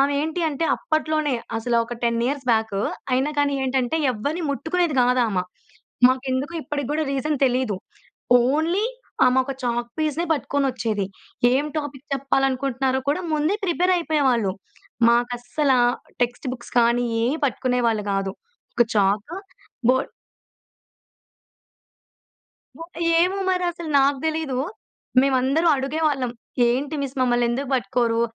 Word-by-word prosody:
ఆమె 280 Hz, +1 st, +3 dB
ఏంటి 320 Hz, +3 st, -2 dB
అంటే 305 Hz, +2 st, -2 dB
అప్పట్లోనే 310 Hz, -2 st, 0 dB, 0.2 s
అసలా 235 Hz, +1 st, +1 dB
ఒక 240 Hz, -, -6 dB
10 235 Hz, -1 st, +1 dB
ఇయర్స్ 275 Hz, 0 st, -3 dB
బ్యాకు 220 Hz, -3 st, +1 dB, 0.3 s
అయినా 265 Hz, +4 st, +2 dB
కానీ 285 Hz, 0 st, +2 dB
ఏంటంటే, 260 Hz, +2 st, 0 dB, 0.2 s
ఎవ్వరిని 285 Hz, +10 st, -3 dB
ముట్టుకునేది 320 Hz, +3 st, 0 dB
కాదు 250 Hz, +1 st, +3 dB
ఆమ. 195 Hz, -4 st, -1 dB, 0.7 s
మాకెందుకో 260 Hz, +4 st, -1 dB
ఇప్పటికి 285 Hz, -2 st, -4 dB
కూడా 310 Hz, +1 st, 0 dB
రీజన్ 290 Hz, +3 st, -1 dB
తెలీదు. 250 Hz, -5 st, 0 dB, 0.6 s
ఓన్లీ 315 Hz, -, +1 dB, 0.4 s
ఆమోక 260 Hz, +1 st, +2 dB
చాక్‌పీస్‌నే 245 Hz, +8 st, -1 dB
పట్టుకొనొచ్చేది. 255 Hz, -8 st, -1 dB, 0.5 s
ఏం 270 Hz, +3 st, +2 dB
టాపిక్ 290 Hz, -2 st, -7 dB
చెప్పాలనుకుంటున్నారో 270 Hz, -1 st, 0 dB
కూడా 310 Hz, +6 st, -1 dB
ముందే 305 Hz, +6 st, +1 dB
ప్రిపేర్ 360 Hz, +1 st, +2 dB
అయిపోయేవాళ్ళు. 265 Hz, -, +1 dB, 0.6 s
మాకస్సలా 245 Hz, +3 st, +1 dB, 0.4 s
టెక్స్ట్ 245 Hz, +3 st, -2 dB
బుక్స్ 240 Hz, -1 st, -13 dB
కానీ, 240 Hz, +1 st, +2 dB, 0.2 s
ఏయి 275 Hz, +7 st, 0 dB
పట్టుకునేవాళ్ళు 245 Hz, -5 st, 0 dB
కాదు. 195 Hz, -1 st, -1 dB, 0.4 s
ఒక 240 Hz, -, +4 dB
చాకు, 205 Hz, -, +1 dB, 0.5 s
బోర్డ్ 260 Hz, +1 st, 0 dB, 2.7 s
బో -, -, -9 dB, 0.4 s
ఏమో 370 Hz, +3 st, +2 dB
మరసలు 350 Hz, -3 st, -2 dB
నాకు 275 Hz, 0 st, +2 dB
తెలీదు. 315 Hz, -5 st, -1 dB, 0.6 s
మేమందరం 270 Hz, +5 st, +2 dB
అడిగేవాళ్ళం 275 Hz, -2 st, 0 dB, 0.4 s
ఏంటి 270 Hz, +5 st, 0 dB
మిస్ 275 Hz, -1 st, -4 dB
మమ్మలనేందుకు 245 Hz, +1 st, +1 dB
పట్టుకోరు? 230 Hz, 0 st, +1 dB
265 Hz, 110 wpm, -23 LUFS, 245-300 Hz, 2.7 s, ఒక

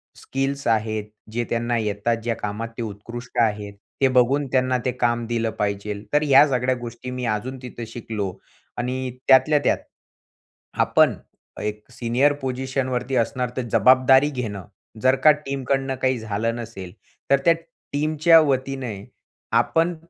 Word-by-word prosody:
Skills 135 Hz, +1 st, -3 dB
आहेत, 110 Hz, -1 st, 0 dB, 0.3 s
जे 120 Hz, +2 st, -1 dB
त्यांना 120 Hz, 0 st, 0 dB
येतात. 105 Hz, +1 st, 0 dB
ज्या 115 Hz, -1 st, -1 dB
कामात 105 Hz, +2 st, -4 dB
ते -, -, -3 dB
उत्कृष्ट 120 Hz, +4 st, -8 dB
आहेत, 105 Hz, -2 st, 0 dB, 0.3 s
ते 135 Hz, -, +6 dB
बघून 135 Hz, +4 st, +3 dB
त्यांना 130 Hz, -1 st, +2 dB
ते 130 Hz, -, +2 dB
काम 120 Hz, -2 st, 0 dB
दिलं 115 Hz, -1 st, -1 dB
पाहिजे. 100 Hz, 0 st, -2 dB
तर 150 Hz, +1 st, +4 dB
ह्या 140 Hz, 0 st, +6 dB
सगळ्या 130 Hz, -1 st, +1 dB
गोष्टी 120 Hz, +1 st, -7 dB
मी 125 Hz, 0 st, -4 dB
अजून 130 Hz, +5 st, -5 dB
तिथं 120 Hz, -2 st, -7 dB
शिकलो. 110 Hz, -4 st, -4 dB, 0.5 s
आणि 125 Hz, +1 st, -2 dB, 0.2 s
त्यातल्या 135 Hz, +3 st, +6 dB
त्यात, -, -, +3 dB, 1.0 s
आपण -, -, +4 dB, 0.5 s
एक 105 Hz, 0 st, -4 dB
सीनियर 125 Hz, +4 st, +2 dB
पोझिशनवरती 130 Hz, 0 st, -2 dB
असणार, 125 Hz, +1 st, 0 dB
तर -, -, +1 dB
जबाबदारी 130 Hz, +5 st, +5 dB
घेणं. 110 Hz, -, -5 dB, 0.4 s
जर 130 Hz, +1 st, +4 dB
का 155 Hz, -, +9 dB
टीमकडून 135 Hz, -2 st, -2 dB
काही 130 Hz, -1 st, +2 dB
झालं 110 Hz, +1 st, -2 dB
नसेल, 110 Hz, -6 st, -7 dB, 0.4 s
तर 140 Hz, -, +7 dB
त्या 170 Hz, -, +7 dB, 0.4 s
टीमच्या 155 Hz, +3 st, +5 dB
वतीने 135 Hz, -5 st, -1 dB, 0.6 s
आपण 165 Hz, +2 st, +1 dB
125 Hz, 140 wpm, -23 LUFS, 115-135 Hz, 1.0 s, का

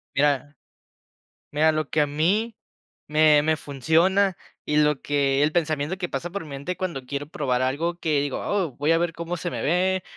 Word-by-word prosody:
Mira, 145 Hz, 0 st, +1 dB, 1.0 s
mira, 155 Hz, +2 st, +3 dB
lo 155 Hz, 0 st, -2 dB
que 155 Hz, -, +2 dB
a 145 Hz, -, +2 dB
mí 195 Hz, +10 st, 0 dB, 0.5 s
me 150 Hz, -1 st, +5 dB
me 155 Hz, +1 st, +2 dB
funciona, 170 Hz, +7 st, +2 dB, 0.3 s
y 150 Hz, -, 0 dB
lo 150 Hz, -2 st, +3 dB
que 140 Hz, -1 st, +1 dB
el 150 Hz, -, +3 dB
pensamiento 155 Hz, 0 st, 0 dB
que 180 Hz, -2 st, -3 dB
pasa 140 Hz, +6 st, -4 dB
por 200 Hz, +1 st, -4 dB
mi 150 Hz, -, -11 dB
mente 140 Hz, +7 st, -5 dB
cuando 170 Hz, -8 st, -4 dB
quiero 140 Hz, +2 st, -4 dB
probar 130 Hz, -5 st, -1 dB
algo, 160 Hz, +7 st, -1 dB
que 155 Hz, -4 st, +1 dB
digo: 140 Hz, -2 st, -2 dB
"Oh, 190 Hz, -8 st, -1 dB
voy 150 Hz, +4 st, +2 dB
a 165 Hz, -, +3 dB
ver 170 Hz, 0 st, 0 dB
cómo 170 Hz, +2 st, -4 dB
se 175 Hz, +1 st, -4 dB
me -, -, -4 dB
ve, 185 Hz, +4 st, +1 dB
155 Hz, 195 wpm, -24 LUFS, 145-175 Hz, 1.0 s, me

